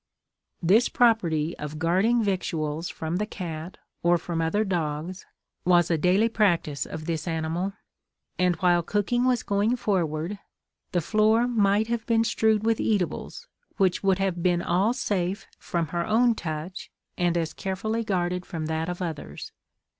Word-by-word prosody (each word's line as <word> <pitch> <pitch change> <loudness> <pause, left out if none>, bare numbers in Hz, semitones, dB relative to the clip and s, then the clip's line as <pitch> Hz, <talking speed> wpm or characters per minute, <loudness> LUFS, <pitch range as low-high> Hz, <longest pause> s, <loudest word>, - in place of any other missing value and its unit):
This 210 +8 +4
property 170 -10 +2
of 150 +1 -5
guarding 190 +9 +2
victuals 165 -5 -2
from 160 +2 -3
the 210 - 0
cat, 170 -3 -6 0.2
or 175 0 +4
from 165 0 -3
other 185 +7 +1
dogs, 175 -1 -3 0.4
was 175 -1 +4
a - - +4
daily 185 +7 +3
practice 175 -10 +1
of 155 -1 -7
this 165 0 -3
animal; 165 +4 -2 0.7
and, 180 -1 +3
while 175 -2 +3
cooking 210 +7 0
was 250 -2 +2
going 205 +4 +1
forward, 180 -4 -1 0.5
the 175 - +1
floor 220 +6 +3
might 210 -3 +2
have 230 0 -3
been 225 -1 +3
strewed 220 -1 +2
with 225 -1 +2
eatables, 200 -6 -2 0.3
which 190 -3 +2
would 195 -2 +3
have 190 -3 -1
been 175 -1 +2
all 195 +6 +2
safe 190 -4 -2
from 170 -3 -2
her 170 +1 -1
own 235 +2 +4
touch, 165 -1 -5 0.3
and 175 -1 +1
as 165 -2 -1
carefully 220 +4 -2
guarded 180 -3 -1
from 160 -3 -5
that 160 +1 -2
of 180 +1 -4
others. 150 - -6
180 Hz, 155 wpm, -26 LUFS, 165-210 Hz, 0.7 s, This